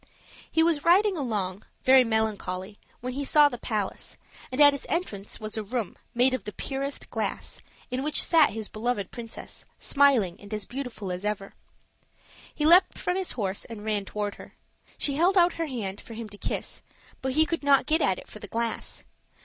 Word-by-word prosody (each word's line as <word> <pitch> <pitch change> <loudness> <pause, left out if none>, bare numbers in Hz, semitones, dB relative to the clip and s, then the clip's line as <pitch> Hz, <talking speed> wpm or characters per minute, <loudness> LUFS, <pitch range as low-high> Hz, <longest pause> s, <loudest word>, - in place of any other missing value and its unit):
He 320 - +4
was 325 -3 +2
riding 385 +4 +5
along, 210 - -2 0.2
very 260 0 +7
melancholy, 210 -3 -2 0.2
when 250 +1 -4
he 280 +2 -3
saw 295 +1 +6
the 245 - -7
palace; 210 -4 -3 0.3
and 255 - -4
at 290 -1 +8
its 280 - -5
entrance 210 - -3
was 215 0 -5
a 220 - -2
room, 225 -1 -3 0.2
made 250 +2 +4
of 255 - -2
the 210 - -6
purest 275 +5 -4
glass, - - -3 0.3
in 255 +1 -1
which 300 +2 +2
sat 320 -3 +5
his 220 0 -5
beloved 215 -3 -2
princess, 235 -2 -9
smiling 255 - +3
and 210 0 -5
beautiful 245 -7 -5
as 180 +2 -4
ever. 210 -2 -3 1.0
He 300 - 0
leaped 355 +4 +6
from 360 - -1
his 380 -1 0
horse 200 -4 -2
and 215 -2 -9
ran 210 -2 0
toward 205 0 -3
her. - - -14 0.4
She 280 -1 0
held 365 +5 +3
out 350 -1 +5
her 330 - 0
hand 205 -7 -4
for 230 - -10
him 225 -1 -6
to 205 - -11
kiss, - - -4 0.4
but 265 0 -1
he 310 +3 +4
could 335 +1 -2
not 280 -1 +4
get 315 +1 +2
at 190 -7 +2
it - - -11
for 215 - -11
the 205 - -8
glass. 230 +3 -3
240 Hz, 190 wpm, -27 LUFS, 210-285 Hz, 1.0 s, at